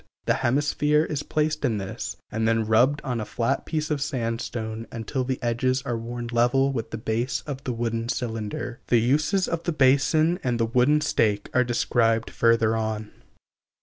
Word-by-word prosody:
The - - +3
hemisphere 145 +3 +2
is 150 -3 -3
placed 155 0 -1
in 120 -6 +1
this, 95 -1 -5
and 110 +1 0
then 115 -1 +2
rubbed 125 +7 +3
on 125 -5 -2
a - - -2
flat 115 +2 -2
piece 155 -1 -2
of 145 -2 0
sandstone 115 -4 -3
until 125 +3 -3
the 130 0 -2
edges 130 +3 0
are 125 -4 -2
worn 120 +1 -5
level 125 +3 +3
with 115 -3 -3
the 110 - -5
base 120 +3 -1
of 140 -2 -6
the 130 - -1
wooden 115 0 -2
cylinder. 115 -1 -3
The 120 - +4
uses 150 - +2
of 165 -1 -2
the 170 - -1
basin 155 +4 +3
and 120 -2 0
the 115 - +3
wooden 125 +6 +3
stake 105 -8 0
are 125 - +4
described 115 -2 +1
further 115 -1 +3
on. 110 -1 -3
120 Hz, 180 wpm, -25 LUFS, 115-140 Hz, -, The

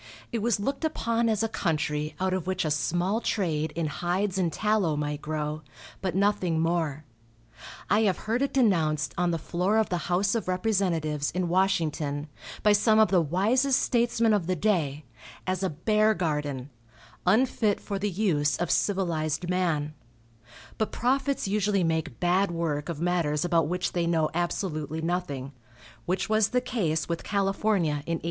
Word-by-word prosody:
It 235 - -1
was 230 -2 +1
looked 275 +9 -2
upon 230 -7 0
as 220 0 +1
a - - +2
country 155 -5 -1
out 190 0 0
of 185 -2 -2
which 185 -3 -1
a 155 - 0
small 175 +8 0
trade 160 -9 -1
in 165 -1 -1
hides 180 +5 -1
and 175 -3 +1
tallow 210 -7 +1
might 150 0 -3
grow, 155 0 -3 0.4
but 185 -3 -2
nothing 190 -4 +1
more. 160 -3 0 0.8
I 210 - +3
have 185 - -1
heard 230 +4 0
it 275 - +1
denounced 160 - +2
on 175 0 +1
the 165 - 0
floor 180 +6 0
of 220 - +2
the 180 - -1
house 190 +3 +2
of 230 -4 -2
representatives, 180 -7 0
in 180 0 -2
Washington, 160 -5 0 0.3
by 210 - +6
some 215 +1 +4
of 220 -1 +5
the 185 -3 +4
wisest 225 - +2
statesmen 235 -2 +2
of 190 -5 0
the 185 - +1
day, 155 -7 0 0.4
as 185 0 -1
a 190 - 0
bear 215 +7 +2
garden, 150 -6 -2 0.6
unfit 215 0 +2
for 200 -2 -4
the 205 +1 0
use 170 -7 +1
of 175 -1 -1
civilized 175 -3 0
man; 160 -5 0 0.9
but 220 - 0
prophets 270 0 0
usually 200 -1 +1
make 160 -7 -1
bad 185 +3 +2
work 165 -3 -2
of 165 -3 -4
matters 170 -3 +1
about 165 -3 +2
which 180 +2 -1
they 170 -1 0
know 160 -2 +1
absolutely 160 -3 -2
nothing, 160 -6 -3 0.5
which 185 +1 0
was 215 -1 +3
the 250 - +2
case 165 -11 -1
with 170 -1 -3
California 195 -3 +1 0.2
in 165 0 0
1848. - - -11
180 Hz, 165 wpm, -27 LUFS, 155-205 Hz, 0.9 s, by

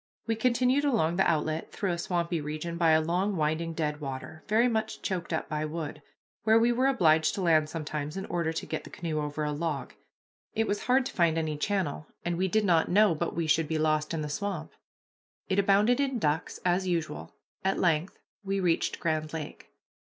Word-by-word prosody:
We 225 - 0
continued 250 +4 +2
along 195 - +2
the 190 - +4
outlet 155 0 -1
through 195 -3 -2
a 170 - -1
swampy 170 -2 -1
region, 155 +3 -4
by 170 -1 +3
a 155 - +6
long, 180 +5 0
winding 160 +1 -1
deadwater, 150 -1 -4
very 225 +3 +4
much 220 -2 -2
choked 180 -3 -3
up 160 - -1
by 150 -1 -2
wood, 155 -1 -5 0.4
where 220 +1 +5
we 235 +1 +4
were 255 +3 +2
obliged 160 -11 +3
to 200 - -3
land 155 -3 +3
sometimes 155 0 -4
in 195 - -4
order 170 -3 -1
to 160 - -4
get 160 - -4
the - - -11
canoe 160 -3 -3
over 150 +1 -3
a 150 - -1
log. 150 -3 -3 0.6
It 225 - +2
was 205 -1 -2
hard 255 +1 +3
to - - -5
find 170 -2 +2
any 155 -2 -1
channel, 160 -3 -2 0.2
and 175 0 0
we 185 +2 +1
did 215 +3 +1
not 170 -4 +3
know 205 0 +5
but 155 - -3
we 170 0 0
should 155 0 +2
be 160 - -1
lost 155 -1 +1
in 165 -2 -2
the - - -3
swamp. 175 +2 -3 0.8
It 190 0 +2
abounded 205 +5 +4
in 270 -3 0
ducks, 155 -4 -1
as 180 +1 +2
usual. 165 -4 -3 0.3
At 190 0 +1
length 170 0 +1 0.3
we 195 0 -1
reached 175 -3 +1
Grand 155 -1 -1
Lake. 155 -2 -7
170 Hz, 205 wpm, -29 LUFS, 155-200 Hz, 0.8 s, a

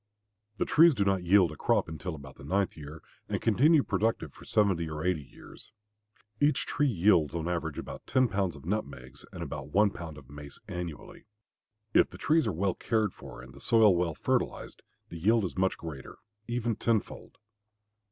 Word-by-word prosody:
The - - 0
trees 165 -1 +6
do 100 -3 +1
not 95 -1 +1
yield 90 -1 +4
a - - -8
crop - - +1
until 80 +2 -5
about 70 -3 -12
the - - -13
ninth 95 +7 0
year 75 +1 -10 0.3
and - - -1
continue 140 +7 +4
productive 100 -7 -1
for - - -15
seventy 95 -6 +1
or 75 +1 -5
eighty 90 -4 +1
years. 70 +9 -13 0.7
Each 145 +1 +2
tree 145 0 +1
yields 85 - +3
on 85 0 -2
an 90 - 0
average 80 -3 -4
about - - -8
ten 130 -1 +3
pounds 95 -6 -1
of 75 - -13
nutmegs 70 -9 -5
and - - -6
about 70 -1 -6
one 100 +5 +3
pound 80 -5 -8
of 70 -4 -13
mace 70 0 -9
annually. 85 -3 -7 0.7
If - - +5
the - - -11
trees 160 -4 +2
are - - +1
well 95 +2 0
cared 110 -4 0
for - - -11
and 65 0 -13
the - - -14
soil 110 -5 +5
well 85 -2 0
fertilized, - - -2 0.3
the 85 - -8
yield 110 +5 +3
is 90 - -4
much 95 +1 +1
greater, 75 -6 -9 0.3
even 120 -2 -1
tenfold. 115 -3 -2
90 Hz, 190 wpm, -29 LUFS, 75-110 Hz, 0.7 s, trees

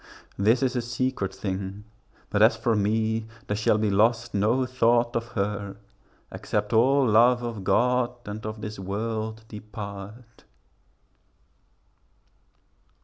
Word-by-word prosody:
This 110 +6 +2
is 130 -1 0
a 125 - +1
secret 120 -4 -2
thing: 95 +1 -5 0.5
but - - +1
as - - +6
for 115 -2 +1
me, 110 +2 0 0.2
There 105 - -2
shall 105 0 +2
be 110 -1 +1
lost 115 +3 +2
no 110 +6 +2
thought 120 -1 +2
of 115 0 -1
her, 100 -1 -3 0.5
except 105 +1 -2
All 135 +5 +4
love 120 +2 +4
of 115 -5 -5
God 125 +4 +2 0.2
and 105 +1 -6
of 110 0 -6
this 105 -1 -6
world 110 +3 -4
depart. 105 +2 -9
110 Hz, 125 wpm, -26 LUFS, 105-120 Hz, 0.5 s, as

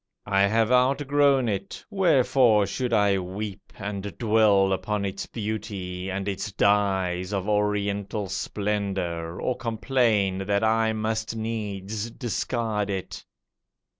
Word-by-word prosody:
I 100 -1 +3
have 110 +2 +2
outgrown 135 +1 +3
it. 100 -2 -4
Wherefore 130 - +4
should 125 +3 -3
I 100 -3 +3
weep 95 +2 -6
And 100 -1 -5
dwell 105 -4 +4
up 95 +2 -4
on 105 -1 0
its 95 0 -4
beauty, 100 -4 -4
and 95 +1 -3
its 100 +2 -3
dyes 95 -2 +1
Of 100 -1 -2
Oriental 105 0 0
splendour, 95 -4 -2
or 125 - -1
complain 110 -5 +1
That 100 +1 +1
I 110 0 +3
must 110 +1 -2
needs 110 -1 -4
discard 115 -3 -2
it? 95 -2 -4
105 Hz, 120 wpm, -25 LUFS, 100-115 Hz, -, Wherefore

